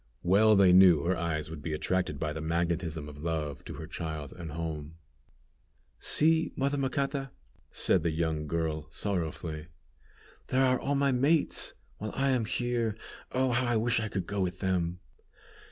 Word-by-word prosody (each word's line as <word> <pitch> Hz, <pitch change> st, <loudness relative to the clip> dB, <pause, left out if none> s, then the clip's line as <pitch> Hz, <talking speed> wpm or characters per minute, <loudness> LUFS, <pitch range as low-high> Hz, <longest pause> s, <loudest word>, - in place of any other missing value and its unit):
Well 105 Hz, +5 st, +5 dB
they 95 Hz, -2 st, +6 dB
knew 90 Hz, -5 st, +7 dB
her 90 Hz, +2 st, +1 dB
eyes 80 Hz, -2 st, -2 dB
would 80 Hz, -2 st, -7 dB
be 80 Hz, +1 st, -3 dB
attracted 75 Hz, -1 st, -1 dB
by 75 Hz, -1 st, -2 dB
the 80 Hz, -, -5 dB
magnetism 85 Hz, -1 st, -1 dB
of 75 Hz, -1 st, -10 dB
love 75 Hz, -4 st, -3 dB
to -, -, -7 dB
her -, -, -7 dB
child 80 Hz, -3 st, -5 dB
and 85 Hz, -4 st, -7 dB
home. 80 Hz, -1 st, -5 dB, 1.0 s
"See, 160 Hz, +1 st, +3 dB
mother 140 Hz, +1 st, 0 dB
Macata," 135 Hz, 0 st, -1 dB, 0.4 s
said 95 Hz, -, +2 dB
the 85 Hz, -, +1 dB
young 80 Hz, -1 st, -1 dB
girl, 80 Hz, -1 st, -2 dB
sorrowfully, 80 Hz, -4 st, -3 dB, 0.8 s
"there 130 Hz, +1 st, +3 dB
are 130 Hz, -1 st, +3 dB
all 140 Hz, -, -1 dB
my 140 Hz, 0 st, +3 dB
mates, 140 Hz, +5 st, +1 dB, 0.2 s
while 105 Hz, 0 st, -5 dB
I 135 Hz, 0 st, +1 dB
am 125 Hz, -4 st, +1 dB
here. 120 Hz, -1 st, -1 dB, 0.4 s
Oh! 130 Hz, 0 st, +2 dB
how 120 Hz, +1 st, +1 dB
I 120 Hz, -1 st, +2 dB
wish 115 Hz, +1 st, +2 dB
I 110 Hz, -, -2 dB
could 95 Hz, -3 st, -3 dB
go 100 Hz, +1 st, -2 dB
with 90 Hz, -1 st, -1 dB
them!" 90 Hz, -2 st, -1 dB
90 Hz, 170 wpm, -30 LUFS, 80-120 Hz, 1.0 s, knew